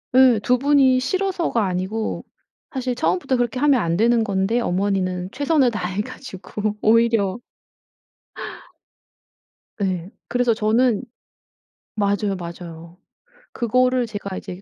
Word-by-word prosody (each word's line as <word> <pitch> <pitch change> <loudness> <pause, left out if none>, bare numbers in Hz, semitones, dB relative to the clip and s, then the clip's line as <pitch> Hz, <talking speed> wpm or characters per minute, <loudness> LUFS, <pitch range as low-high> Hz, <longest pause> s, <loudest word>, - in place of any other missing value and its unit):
예. 255 -4 +6
2 250 - +3
분이 270 -1 +4
싫어서가 355 - 0
아니고 190 +4 -2 0.5
사실 255 -2 -2
처음부터 180 +5 0
그렇게 245 0 -1
하면 280 -3 +4
안 170 -2 0
되는 230 +2 +3
건데 200 +2 0
어머니는 185 -3 -1
최선을 285 -2 +2
다해 190 -2 -2
가지고 210 -2 -5
오히려 225 -2 +3 2.4
네. 185 -3 -2 0.2
그래서 245 0 +2
저는 225 +2 +2 0.9
맞아요, 205 -1 0
맞아요. 170 -1 -9 0.5
그거를 250 +1 +2
제가 200 -3 -6
이제 180 +1 -8
220 Hz, 245 characters per minute, -22 LUFS, 190-250 Hz, 2.4 s, 예